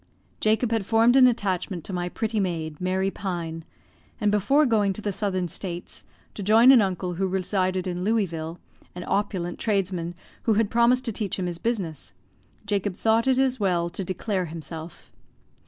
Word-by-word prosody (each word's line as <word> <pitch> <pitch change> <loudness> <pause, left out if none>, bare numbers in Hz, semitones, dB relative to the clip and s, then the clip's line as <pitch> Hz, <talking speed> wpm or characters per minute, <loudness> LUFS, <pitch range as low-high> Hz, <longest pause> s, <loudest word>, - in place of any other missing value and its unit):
Jacob 220 +2 +1
had 225 -3 +1
formed 225 +4 +4
an 260 -1 +8
attachment 190 -6 -1
to 195 - -7
my 175 0 -2
pretty 220 +3 -2
maid, 165 -5 -3
Mary 190 +1 0
Pine, 170 -5 -4 0.6
and 210 -1 +2
before 240 +9 +3
going 210 -5 +2
to 215 - -5
the 205 - -1
Southern 185 -2 -1
States, 175 +1 -6 0.3
to - - -7
join 225 +6 +6
an 255 -4 +7
uncle 185 -2 -1
who 190 +2 -1
resided 185 0 -1
in 180 -1 -3
Louisville, 175 -6 -1 0.4
an 180 - -6
opulent 185 -4 -1
tradesman, 185 -5 -1 0.3
who 220 - +3
had 215 -1 +1
promised 240 +2 +3
to 230 - -1
teach 210 -2 -2
him 185 - -2
his 175 -1 -4
business, 190 - -3 0.5
Jacob 205 -2 -1
thought 225 +4 +2
it 260 -1 +3
as 260 -1 +1
well 175 -4 0
to 195 - -4
declare 185 +1 -2
himself. 160 0 -8
195 Hz, 170 wpm, -25 LUFS, 175-220 Hz, 0.6 s, an